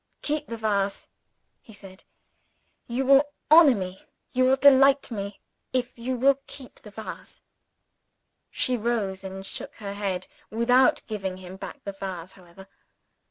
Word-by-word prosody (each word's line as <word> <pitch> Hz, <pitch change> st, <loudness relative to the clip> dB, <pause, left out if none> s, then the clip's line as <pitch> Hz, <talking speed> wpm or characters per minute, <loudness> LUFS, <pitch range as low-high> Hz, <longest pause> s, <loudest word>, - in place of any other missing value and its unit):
"Keep 300 Hz, 0 st, -2 dB
the 230 Hz, -, -5 dB
vase!" 200 Hz, -3 st, -1 dB, 0.5 s
he 225 Hz, -, -16 dB
said. 195 Hz, -2 st, -14 dB, 0.8 s
"You 255 Hz, +2 st, -2 dB
will 275 Hz, +1 st, +7 dB, 0.3 s
honor 310 Hz, -5 st, +8 dB
me, 185 Hz, -1 st, -5 dB, 0.3 s
you 255 Hz, 0 st, +2 dB
will 260 Hz, +1 st, +5 dB
delight 275 Hz, 0 st, +5 dB
me, 200 Hz, -2 st, -5 dB, 0.3 s
if 250 Hz, -1 st, -1 dB
you 245 Hz, +2 st, -3 dB
will 270 Hz, +2 st, +3 dB
keep 260 Hz, -3 st, -12 dB
the 210 Hz, -, -12 dB
vase." 215 Hz, +2 st, -10 dB, 1.1 s
She 255 Hz, -, +1 dB
rose 215 Hz, -5 st, -2 dB
and 190 Hz, 0 st, -7 dB
shook -, -, -8 dB
her 200 Hz, -2 st, -6 dB
head 195 Hz, -3 st, -3 dB, 0.2 s
without 245 Hz, +3 st, +3 dB
giving 195 Hz, -4 st, -4 dB
him 185 Hz, 0 st, -10 dB
back 190 Hz, -, -9 dB
the 200 Hz, -, -4 dB
vase, 190 Hz, -3 st, -7 dB
however. 185 Hz, +1 st, -15 dB
220 Hz, 145 wpm, -26 LUFS, 195-255 Hz, 1.1 s, honor